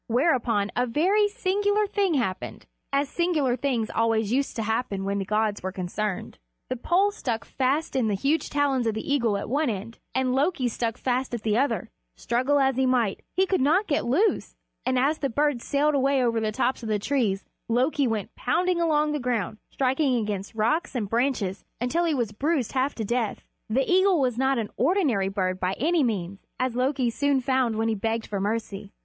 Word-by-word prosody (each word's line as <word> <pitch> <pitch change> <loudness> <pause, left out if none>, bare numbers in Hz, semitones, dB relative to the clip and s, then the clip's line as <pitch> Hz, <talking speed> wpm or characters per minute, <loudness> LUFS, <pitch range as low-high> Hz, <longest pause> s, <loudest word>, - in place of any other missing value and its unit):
Whereupon 235 -5 +1
a 250 +1 +1
very 380 - +3
singular 410 -1 +1
thing 395 -4 0
happened, 210 -9 -3 0.3
as 280 +1 +1
singular 305 -6 +1
things 245 -4 -1
always 225 -2 +1
used 275 +2 0
to 225 - -2
happen 220 -3 -1
when 200 0 -1
the 195 - -2
gods 215 +1 0
were 190 - -3
concerned: 190 - -4 0.3
the 255 - -1
pole 365 +11 +2
stuck 235 - -3
fast 275 +4 -1
in 250 -4 +2
the 205 - +1
huge 285 +9 0
talons 275 -4 +1
of 220 - 0
the 220 +6 -2
eagle 235 -7 +2
at 200 - -5
one 285 +3 +1
end, 220 +2 -5 0.2
and 260 -1 +1
Loki 275 -1 +1
stuck 230 -1 -2
fast 255 0 -1
at 230 - -6
the 215 -1 +1
other 235 -4 +2
end. - - -16 0.3
Struggle 255 - +1
as 270 -2 +2
he 265 0 +2
might, 240 -6 +1
he 380 +2 +3
could 380 -5 0
not 325 +10 +3
get 290 -6 0
loose, 320 - +1 0.3
and 255 0 +2
as 285 +5 +2
the 275 - -1
great 230 - -12
bird 290 -4 +1
sailed 290 +4 +1
away 275 -1 +2
over 230 -2 +1
the 215 -1 -1
tops 255 +3 0
of 225 - -5
the 215 - +2
trees, 205 -4 0 0.3
Loki 260 +4 +2
went 220 -3 -3
pounding 345 +6 0
along 305 -2 +2
on - - -1
the 295 - -1
ground, 230 -5 -2
striking 265 0 +1
against 210 -3 -3
rocks 240 +9 0
and 215 -5 -2
branches 230 -6 0 0.2
until 285 +9 0
he 320 -3 +1
was 235 -5 -1
bruised 275 +3 -1
half 265 +2 0
to 220 - -3
death. 235 -1 -1 0.3
The 260 +5 +1
eagle 375 -1 +4
was 255 -4 +1
not 265 +2 +1
an 220 -3 -3
ordinary 265 - +2
bird 185 -2 -1
by 185 0 0
any 320 - +1
means, 200 -6 -1 0.2
as 255 -2 0
Loki 255 -1 +1
soon 285 +2 +1
found 260 -3 +1
when 225 +1 0
he 225 - +1
begged 225 +2 -2
for 200 - -3
mercy. 205 -1 -3
250 Hz, 205 wpm, -26 LUFS, 220-285 Hz, 0.3 s, eagle